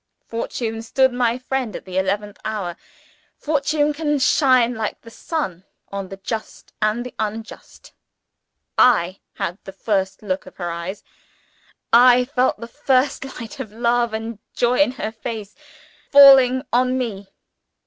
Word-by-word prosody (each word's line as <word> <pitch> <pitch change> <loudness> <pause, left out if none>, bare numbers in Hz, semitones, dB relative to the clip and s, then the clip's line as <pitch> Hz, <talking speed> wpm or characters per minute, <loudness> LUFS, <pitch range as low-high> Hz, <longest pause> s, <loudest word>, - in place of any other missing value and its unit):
Fortune 230 -1 -4
stood 260 +3 +2
my 245 -1 +1
friend 255 -3 -3
at - - -8
the 185 0 -2
eleventh 205 +2 -2
hour; 205 -5 -3 0.6
fortune 295 0 0
can 295 -1 0
shine, 255 -3 +3
like 220 -2 -4
the 230 - -13
sun, 210 - -4 0.3
on 195 -1 -5
the 195 - -8
just 220 +3 -6
and 215 +3 0
the 250 - -8
unjust! 220 +1 -6 0.9
I 185 -7 +4 0.2
had 180 +4 -4
the 195 - -9
first 195 0 -2
look 190 -2 -3
of - - -14
her 175 -2 -3
eyes! 170 +4 -6 0.9
I 250 +1 +7
felt 255 -4 0
the 230 - -7
first 270 0 0
light 250 +5 -9
of 230 -6 -6
love 235 +1 +1
and 220 0 -5 0.2
joy 245 +2 +2
in 290 -4 +3
her 220 -4 -4
face 220 -2 -6 0.6
falling 270 -2 +8
on 255 +1 +2
_me! 205 -6 -4
230 Hz, 145 wpm, -21 LUFS, 205-255 Hz, 0.9 s, falling